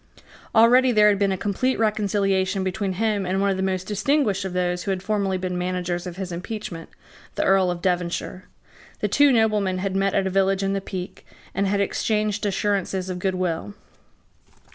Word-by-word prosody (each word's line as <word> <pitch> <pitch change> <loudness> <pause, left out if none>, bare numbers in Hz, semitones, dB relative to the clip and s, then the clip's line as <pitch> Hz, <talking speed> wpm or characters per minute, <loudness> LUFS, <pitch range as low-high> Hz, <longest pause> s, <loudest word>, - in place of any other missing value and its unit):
Already 245 +3 +6
there 210 -2 +5
had 200 -1 +1
been 200 -1 +2
a 190 - -1
complete 205 +7 -1
reconciliation 200 -3 +1
between 190 +1 -2
him 210 0 0
and 185 +1 -1
one 200 0 +2
of - - 0
the - - -2
most 185 -1 -1
distinguished 210 +1 +1
of 190 - -4
those 180 -1 -1
who - - -5
had 190 -1 -2
formerly 200 -2 0
been 180 0 -3
managers 180 0 -2
of 175 - -6
his 190 -2 -5
impeachment, 175 -2 -6 0.5
the - - 0
Earl 190 -1 +3
of 175 -1 -4
Devonshire. 180 0 -2 0.6
The - - +1
two 290 -1 +4
noblemen 215 -5 +2
had 190 +1 -2
met 195 0 +1
at 195 - +2
a 190 - -1
village 195 0 +2
in 195 0 0
the 195 - -1
Peak, 185 -1 -7 0.3
and 200 0 0
had 200 +1 +1
exchanged 210 +1 0
assurances 190 -2 -1
of 180 - -5
good 190 0 -1
will. 165 - -3
195 Hz, 190 wpm, -23 LUFS, 185-205 Hz, 0.6 s, Already